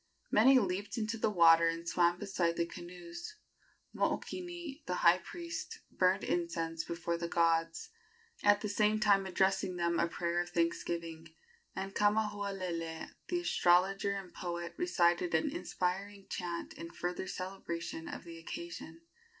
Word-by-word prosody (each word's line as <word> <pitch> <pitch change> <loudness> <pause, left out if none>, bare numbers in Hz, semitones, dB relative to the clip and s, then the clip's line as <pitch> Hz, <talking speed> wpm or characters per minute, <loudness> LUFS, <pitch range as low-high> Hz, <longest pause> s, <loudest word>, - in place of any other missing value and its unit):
Many 260 +5 +7
leaped 200 -2 -1
into 225 0 -2
the 220 - +2
water 165 -3 +6
and 165 +1 -2
swam 175 0 +3
beside 180 -4 0
the 170 - +2
canoes. 175 - -9 0.6
Mookini, 345 -5 -3
the 180 - 0
high 170 +2 +7
priest, 340 - -6
burned 185 0 +2
incense 165 -1 -1
before 170 0 -2
the 170 - -2
gods, 165 -1 +1 0.5
at 205 0 +5
the 210 - -2
same 210 +1 +2
time 200 -2 +4
addressing 190 0 +1
them 170 -1 +1
a 170 - +3
prayer 170 0 -1
of 175 - -5
thanksgiving, 165 -1 -2 0.5
and 195 0 -4
Kamahualele, 200 -6 -1 0.2
the 350 -1 0
astrologer 195 - +3
and 195 -3 -6
poet, 175 -1 -4
recited 175 - +2
an 160 - +1
inspiring 190 +3 -3
chant 175 -2 -4
in 170 - -8
further 180 +2 -4
celebration 180 -3 -5
of - - -6
the 165 -1 -9
occasion. 165 0 -7
180 Hz, 140 wpm, -33 LUFS, 170-205 Hz, 0.6 s, Many